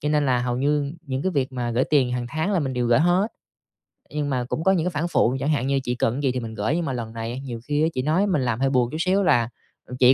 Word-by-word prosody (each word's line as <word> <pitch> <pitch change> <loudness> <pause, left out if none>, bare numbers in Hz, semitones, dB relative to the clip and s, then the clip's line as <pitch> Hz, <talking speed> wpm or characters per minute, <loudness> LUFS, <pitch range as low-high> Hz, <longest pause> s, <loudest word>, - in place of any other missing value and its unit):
cho 150 - -1
nên 150 -1 +2
là 125 -2 +3
hầu 125 -1 -1
như 145 +2 0
những 130 0 -2
cái 190 - +1
việc 135 -3 -1
mà 120 -2 -2
gởi 120 +3 +1
tiền 135 -5 +3
hàng 125 -1 -2
tháng 160 +9 -1
là 190 - +2
mình 135 -3 -2
đều 125 -1 0
gởi 120 0 +4
hết. 180 +6 +2 0.8
Nhưng 150 -1 -2
mà 130 -3 0
cũng 140 +6 -3
có 190 - +4
những 175 -4 +1
cái 180 - 0
phản 160 +2 -1
phụ 130 -7 +2
chẳng 145 - -1
hạn 140 -4 +1
như 140 0 +2
chị 125 -1 -2
cần 115 -1 +1
cái 140 - -3
gì 135 -3 +2
thì 130 - -2
mình 115 -2 -6
gởi, 110 +8 -1
nhưng 170 -1 -1
mà 135 - -2
lần 115 -2 -5
này 115 +2 -4
nhiều 120 -3 -5
khi 145 0 +1
á - - +4
chị 130 - -1
nói 160 +9 +2
mình 180 -8 +1
làm 120 -2 -1
hơi 135 0 +2
buồn 125 -3 +2
chút 155 - -4
xíu 190 +4 +2
là 120 -9 +3 0.4
"Ờ, 125 - -7
chị 125 +1 +7
135 Hz, 320 wpm, -24 LUFS, 125-155 Hz, 0.8 s, chị